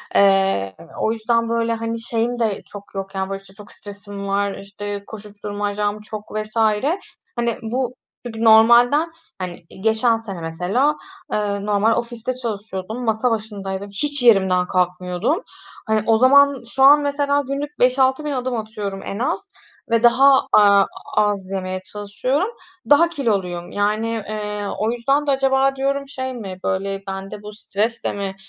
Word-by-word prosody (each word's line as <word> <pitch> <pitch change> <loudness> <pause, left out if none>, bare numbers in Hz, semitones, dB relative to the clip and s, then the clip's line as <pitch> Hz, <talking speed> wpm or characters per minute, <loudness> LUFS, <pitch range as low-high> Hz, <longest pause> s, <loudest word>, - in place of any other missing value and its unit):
eee 195 - +3 0.3
o 220 - +2
yüzden 230 +1 0
böyle, 230 0 0
hani, 230 0 -3
şeyim 235 +1 -1
de 220 -4 0
çok 205 -1 -12
yok, 195 0 -5
yani, 190 0 -2
böyle, 195 0 -4
işte, 195 0 -16
çok 205 +1 -13
stresim 200 -1 -8
var, 200 0 0
işte, 200 0 -6
koşuşturmacam 205 0 -4
çok 215 0 -8
vs. 215 +1 -4 0.8
Hani, 235 -1 -1
bu 245 +3 -2 0.3
çünkü 225 -1 -5
normalden, 240 +8 +6 0.3
hani, 180 -2 -6 0.2
geçen 225 +1 +3
sene, 195 -6 -7
mesela, 180 - 0 0.4
eee, 200 -1 -1
normal 210 +2 +2
ofiste 240 +1 -3
çalışıyordum, 220 -1 -5
masa 225 +2 +1
başındaydım, 200 -3 -4
hiç 285 +5 -1
yerimden 190 -5 +4
kalkmıyordum. 180 - 0 0.4
Hani, 220 -1 +1
o 225 -1 +5
zaman 280 +1 +5
şu 265 +2 +1
an, 290 +2 +8
mesela, 285 0 +1
günlük 285 +2 -4
5.000-6.000 265 +4 +2
adım 255 -2 -2
atıyorum 215 -3 -5
en 200 - -5
az 345 +10 -2 0.4
ve 230 0 +2
daha, 265 +3 +6
aaa, 200 -1 +6 0.3
az 205 -3 +1
yemeye 185 -1 -3
çalışıyorum, 255 - -1 0.4
daha 335 +4 +6
kiloluyum. 190 - -2
Yani, 210 +2 0 0.2
eee, 210 -1 -4 0.2
o 220 +2 +1
yüzden 275 +5 0
de - - +3
acaba 270 0 +2
diyorum 275 +1 -1
şey 260 -1 -5
mi 195 -6 -7
böyle 195 +1 -2
bende 195 +2 -6
bu 210 - -8
stres 220 +2 -2
de - - -1
mi 195 -1 -4
220 Hz, 150 wpm, -21 LUFS, 200-250 Hz, 0.8 s, an